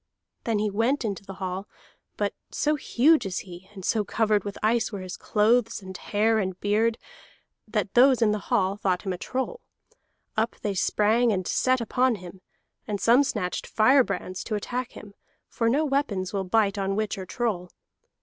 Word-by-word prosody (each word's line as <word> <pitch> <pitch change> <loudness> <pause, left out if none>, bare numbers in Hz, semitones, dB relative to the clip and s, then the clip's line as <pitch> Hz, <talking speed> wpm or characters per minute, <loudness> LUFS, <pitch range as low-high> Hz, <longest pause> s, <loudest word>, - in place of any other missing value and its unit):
Then 225 -2 +1
he 210 0 0
went 235 +6 +1
into 200 -2 -3
the 195 -1 -9
hall; 190 +1 -4 0.5
but - - -1 0.2
so 300 - 0
huge 295 +2 +3
is 190 -2 -3
he, 180 +1 -12
and 190 -3 -9
so 220 -2 +1
covered 215 -1 +1
with 200 -1 -6
ice 230 +2 +2
were 200 -3 -5
his 185 -1 -6
clothes 225 +2 +2
and 190 -2 -10
hair 220 +4 +1
and 190 -2 -3
beard, 220 +3 +1 0.7
that 210 -3 -2
those 255 +1 +6
in 225 -3 +3
the 210 - -1
hall 190 0 +2
thought 185 -3 0
him 190 -3 -2
a 180 - -7
troll. 265 - -3 0.7
Up 220 +2 0
they 205 - 0
sprang 220 +5 +2
and 185 -3 -1
set 255 0 +2
upon 250 +2 +2
him, 185 -1 -11 0.5
and 205 -2 -2
some 240 +7 +5
snatched 185 -9 -3
firebrands 215 -6 +2
to 215 - -2
attack 245 +4 -4
him, 205 -1 -11 0.3
for 230 -1 0
no 290 +6 +2
weapons 250 -11 -1
will 195 -1 -1
bite 200 +1 +2
on 195 0 -1
witch 215 0 -1
or 185 - -7
troll. 200 -7 -2
210 Hz, 180 wpm, -26 LUFS, 195-235 Hz, 0.7 s, those